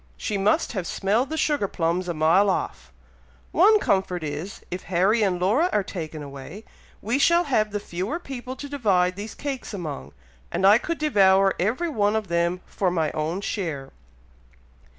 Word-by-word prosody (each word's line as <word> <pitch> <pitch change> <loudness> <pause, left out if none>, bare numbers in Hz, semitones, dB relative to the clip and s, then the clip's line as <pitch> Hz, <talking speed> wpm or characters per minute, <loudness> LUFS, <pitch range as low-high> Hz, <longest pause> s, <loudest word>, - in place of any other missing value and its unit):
she 210 - -3
must 205 +11 +1
have 190 -6 -3
smelled 220 +7 0
the 315 - -3
sugar 295 -10 +1
plums 175 +1 -1
a - - 0
mile 165 +6 +4
off! 65 - -3 0.6
one 420 +6 +5
comfort 190 - 0
is, 155 +6 -5
if 180 +1 -4
Harry 190 +5 +2
and 190 -4 +1
Laura 225 - +2
are 210 - +1
taken 160 -5 -6
away, 140 +9 -9 0.4
we 235 +6 0
shall 340 +4 +4
have 220 -9 +1
the 205 0 -3
fewer 190 - -4
people 260 -6 -7
to 285 +2 -7
divide 195 -10 +1
these 205 +3 -7
cakes 270 -6 -5
among, 70 - -6 0.4
and 185 +2 0
I 205 +4 +7
could 335 +5 -3
devour 195 -9 +4
every 230 - 0
one 210 -6 +1
of 215 -4 -2
them, 170 +1 0
for 190 - -1
my 160 -4 0
own 160 +5 -2
share." 160 -10 -4
195 Hz, 170 wpm, -24 LUFS, 175-235 Hz, 0.6 s, I